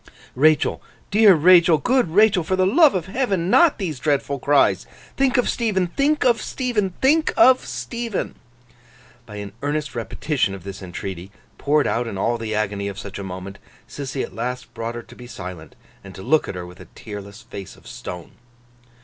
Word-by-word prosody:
'Rachael, 155 Hz, +3 st, +2 dB, 0.3 s
dear 205 Hz, -2 st, +6 dB
Rachael, 170 Hz, 0 st, +6 dB
good 250 Hz, -, +1 dB
Rachael, 195 Hz, 0 st, +4 dB
for 185 Hz, +4 st, -1 dB
the 185 Hz, 0 st, +2 dB
love 285 Hz, -, +5 dB
of 175 Hz, -3 st, -1 dB
Heaven, 195 Hz, -5 st, -1 dB
not 340 Hz, -3 st, +5 dB
these 165 Hz, -, -4 dB
dreadful 140 Hz, -1 st, -1 dB
cries! 145 Hz, +2 st, +2 dB, 0.3 s
Think 270 Hz, 0 st, +2 dB
of 245 Hz, -, +2 dB
Stephen, 210 Hz, -6 st, 0 dB
think 290 Hz, -, +1 dB
of 235 Hz, -3 st, +3 dB
Stephen, 215 Hz, -8 st, -2 dB
think 310 Hz, +4 st, +3 dB
of 260 Hz, -7 st, +6 dB
Stephen!' 235 Hz, -4 st, -4 dB, 0.9 s
By 105 Hz, -, -10 dB
an 100 Hz, -1 st, -7 dB
earnest 145 Hz, 0 st, -2 dB
repetition 120 Hz, -2 st, -2 dB
of 95 Hz, -, -11 dB
this 100 Hz, +1 st, -8 dB
entreaty, 95 Hz, 0 st, -7 dB, 0.3 s
poured 150 Hz, 0 st, +2 dB
out 120 Hz, 0 st, -1 dB
in 100 Hz, -, -5 dB
all 115 Hz, +4 st, 0 dB
the 110 Hz, -1 st, -3 dB
agony 100 Hz, -1 st, -2 dB
of 100 Hz, -1 st, -6 dB
such 100 Hz, 0 st, -7 dB
a -, -, -5 dB
moment, 95 Hz, +1 st, -8 dB, 0.3 s
Sissy 135 Hz, -1 st, -5 dB
at -, -, -8 dB
last 125 Hz, +2 st, -5 dB
brought 115 Hz, +1 st, -5 dB
her 120 Hz, -, -6 dB
to -, -, -16 dB
be 125 Hz, -, -11 dB
silent, 90 Hz, -8 st, -9 dB, 0.3 s
and 95 Hz, -1 st, -11 dB
to 95 Hz, -, -9 dB
look 155 Hz, +7 st, +2 dB
at -, -, -5 dB
her 90 Hz, -1 st, -6 dB
with 90 Hz, +1 st, -13 dB
a -, -, -11 dB
tearless 105 Hz, 0 st, -9 dB
face 100 Hz, -4 st, -9 dB
of -, -, -21 dB
stone. 90 Hz, +7 st, -8 dB
140 Hz, 185 wpm, -22 LUFS, -, 0.9 s, dear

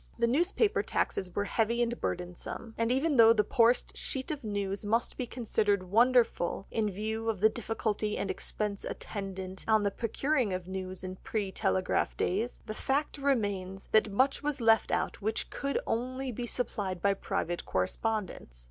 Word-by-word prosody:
The 235 Hz, -, +3 dB
newspaper 350 Hz, -, +2 dB
taxes 180 Hz, -2 st, -1 dB
were 205 Hz, -, +1 dB
heavy 225 Hz, +3 st, +1 dB
and 240 Hz, 0 st, -3 dB
burdensome, 180 Hz, +6 st, -4 dB
and 230 Hz, 0 st, 0 dB
though 250 Hz, -, +3 dB
even 285 Hz, +1 st, +1 dB
the 225 Hz, -2 st, +7 dB
poorest 240 Hz, -1 st, +3 dB
sheet 265 Hz, +1 st, -3 dB
of 295 Hz, -3 st, -5 dB
news 200 Hz, -2 st, -2 dB
must 225 Hz, +3 st, 0 dB
be 250 Hz, -, -3 dB
considered 215 Hz, -5 st, +1 dB
wonderful 235 Hz, -5 st, +3 dB
in 220 Hz, -2 st, +1 dB
view 220 Hz, +3 st, -2 dB
of 215 Hz, -4 st, -1 dB
the 215 Hz, +3 st, +6 dB
difficulty 215 Hz, -1 st, -2 dB
and 195 Hz, -, -1 dB
expense 200 Hz, +1 st, -3 dB
attendant 190 Hz, -2 st, -5 dB
on 220 Hz, -1 st, +4 dB
the 200 Hz, -, +1 dB
procuring 240 Hz, +1 st, 0 dB
of 185 Hz, -1 st, -4 dB
news 185 Hz, -1 st, -5 dB
in 185 Hz, 0 st, -5 dB
pre 205 Hz, -2 st, -3 dB
telegraph 185 Hz, -1 st, 0 dB
days, 220 Hz, +7 st, -1 dB
the 215 Hz, -, -4 dB
fact 285 Hz, +5 st, -1 dB
remains 205 Hz, -8 st, 0 dB
that 215 Hz, -1 st, +4 dB
much 260 Hz, +7 st, +2 dB
was 295 Hz, -1 st, -1 dB
left 225 Hz, -1 st, +4 dB
out -, -, -1 dB
which 220 Hz, +2 st, -2 dB
could 280 Hz, 0 st, -2 dB
only 255 Hz, +3 st, -2 dB
be 240 Hz, +1 st, -4 dB
supplied 205 Hz, -7 st, -2 dB
by 200 Hz, +2 st, +3 dB
private 175 Hz, -2 st, -2 dB
correspondence. 175 Hz, -, -2 dB
220 Hz, 165 wpm, -30 LUFS, 195-240 Hz, -, the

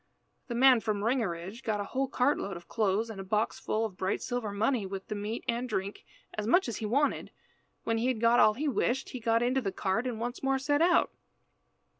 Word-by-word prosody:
The 240 Hz, -, -4 dB
man 255 Hz, 0 st, +6 dB
from 210 Hz, -2 st, -2 dB
Ringerige 215 Hz, -3 st, -1 dB
got 215 Hz, -5 st, -1 dB
a -, -, -1 dB
whole 265 Hz, +6 st, -2 dB
cart 265 Hz, +3 st, +1 dB
load 195 Hz, -3 st, -4 dB
of 170 Hz, -, -14 dB
clothes 220 Hz, 0 st, 0 dB
and 195 Hz, -3 st, -7 dB
a -, -, -6 dB
box 210 Hz, +3 st, -1 dB
full 220 Hz, +1 st, -1 dB
of 195 Hz, -4 st, -7 dB
bright 190 Hz, +1 st, -1 dB
silver 245 Hz, -4 st, -3 dB
money, 220 Hz, +3 st, +1 dB
with 195 Hz, +1 st, -7 dB
meat 210 Hz, +2 st, -4 dB
and 240 Hz, +2 st, -1 dB
drink, 195 Hz, -1 st, -3 dB, 0.3 s
as 215 Hz, 0 st, -3 dB
much 355 Hz, +8 st, +4 dB
as 235 Hz, -, -3 dB
he 220 Hz, -, -3 dB
wanted. 280 Hz, +7 st, +1 dB, 0.5 s
When 225 Hz, 0 st, 0 dB
he 240 Hz, -, 0 dB
had 255 Hz, -4 st, 0 dB
got 230 Hz, +1 st, +4 dB
all 215 Hz, -, +6 dB
he 300 Hz, +5 st, -2 dB
wished, 265 Hz, -1 st, 0 dB
he 255 Hz, -, -6 dB
got 230 Hz, 0 st, +2 dB
into 255 Hz, +2 st, +1 dB
the 200 Hz, -5 st, -2 dB
cart, 195 Hz, +6 st, -1 dB
and 235 Hz, -3 st, -4 dB
once 240 Hz, +2 st, -4 dB
more 270 Hz, 0 st, +1 dB
set 290 Hz, +3 st, +1 dB
out. 345 Hz, +1 st, +4 dB
230 Hz, 225 wpm, -30 LUFS, 205-255 Hz, 0.5 s, man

